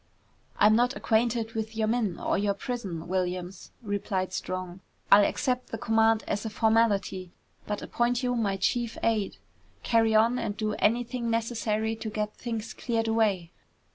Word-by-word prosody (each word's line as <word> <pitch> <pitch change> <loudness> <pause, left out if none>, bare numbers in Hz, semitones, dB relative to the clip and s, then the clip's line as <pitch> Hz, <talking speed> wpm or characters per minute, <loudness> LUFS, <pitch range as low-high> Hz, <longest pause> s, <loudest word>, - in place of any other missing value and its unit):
"I'm 215 +1 +6
not 245 +3 +2
acquainted 225 0 +1
with 220 0 -4
your 220 -1 +1
men, 220 -5 0
or - - 0
your 200 0 +1
prison, 200 -8 -5
Williams," 180 0 -3
replied 200 -2 -2
Strong. 185 0 -4 0.3
"I'll 205 +1 +9
accept 250 +4 0
the 225 - -5
command 225 -1 +3
as 205 - -1
a 220 - -3
formality 210 -5 +1 0.3
but 210 -1 -3
appoint 240 +1 0
you 245 0 +1
my 200 -4 0
chief 235 +4 0
aid. 215 -3 0 0.5
Carry 225 -1 +3
on 230 +3 +4
and 220 -3 -3
do 215 -1 -1
anything 235 +2 +1
necessary 225 -1 -1
to 220 - -5
get 210 0 -3
things 230 -2 -5
cleared 230 -2 -1
away." 205 -7 +1
220 Hz, 155 wpm, -28 LUFS, 200-230 Hz, 0.5 s, I'll